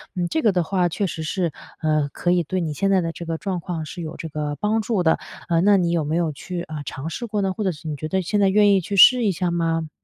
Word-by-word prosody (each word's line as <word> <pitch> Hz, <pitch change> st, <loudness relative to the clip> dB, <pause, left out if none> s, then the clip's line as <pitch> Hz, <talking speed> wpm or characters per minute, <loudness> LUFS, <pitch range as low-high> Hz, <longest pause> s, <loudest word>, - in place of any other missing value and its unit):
嗯， 175 Hz, -1 st, -1 dB
这 320 Hz, -, 0 dB
个 220 Hz, -7 st, +4 dB
的 180 Hz, -2 st, +1 dB
话 180 Hz, +1 st, +1 dB
确 200 Hz, +4 st, -1 dB
实 160 Hz, -2 st, -5 dB
是， 170 Hz, 0 st, -1 dB, 0.3 s
呃， 155 Hz, -2 st, +1 dB
可 175 Hz, -, 0 dB
以 175 Hz, -1 st, +3 dB
对 185 Hz, +4 st, -2 dB
你 155 Hz, -3 st, -2 dB
现 195 Hz, +6 st, 0 dB
在 190 Hz, -2 st, +4 dB
的 165 Hz, 0 st, -2 dB
这 170 Hz, -, -8 dB
个 165 Hz, 0 st, -3 dB
状 185 Hz, -1 st, -3 dB
况 165 Hz, -2 st, -4 dB
是 175 Hz, +3 st, -7 dB
有 160 Hz, 0 st, -6 dB
这 160 Hz, -, -6 dB
个 150 Hz, -1 st, -3 dB
帮 215 Hz, +2 st, +1 dB
助 210 Hz, -5 st, 0 dB
的。 160 Hz, -, +3 dB, 0.3 s
呃， 165 Hz, 0 st, +3 dB
那 200 Hz, +1 st, +5 dB
你 175 Hz, -2 st, +1 dB
有 170 Hz, -3 st, +1 dB
没 155 Hz, +3 st, -1 dB
有 170 Hz, -3 st, +1 dB
去， 175 Hz, +5 st, -6 dB
呃， 155 Hz, -3 st, -6 dB
尝 135 Hz, +5 st, -5 dB
试 235 Hz, -, -5 dB
过 210 Hz, -1 st, -1 dB
呢？ 190 Hz, -1 st, 0 dB
或 215 Hz, -, -4 dB
者 190 Hz, -, +1 dB
是 155 Hz, 0 st, -10 dB
你 150 Hz, -, -3 dB
觉 155 Hz, +2 st, -5 dB
得 190 Hz, +3 st, 0 dB
现 205 Hz, +4 st, -1 dB
在 195 Hz, -1 st, +4 dB
愿 205 Hz, 0 st, +5 dB
意 190 Hz, -, +3 dB
去 200 Hz, +4 st, -4 dB
试 245 Hz, +5 st, +8 dB
一 200 Hz, -, +3 dB
下 175 Hz, 0 st, -1 dB
吗？ 165 Hz, -2 st, -1 dB
175 Hz, 325 characters per minute, -22 LUFS, 160-195 Hz, 0.3 s, 试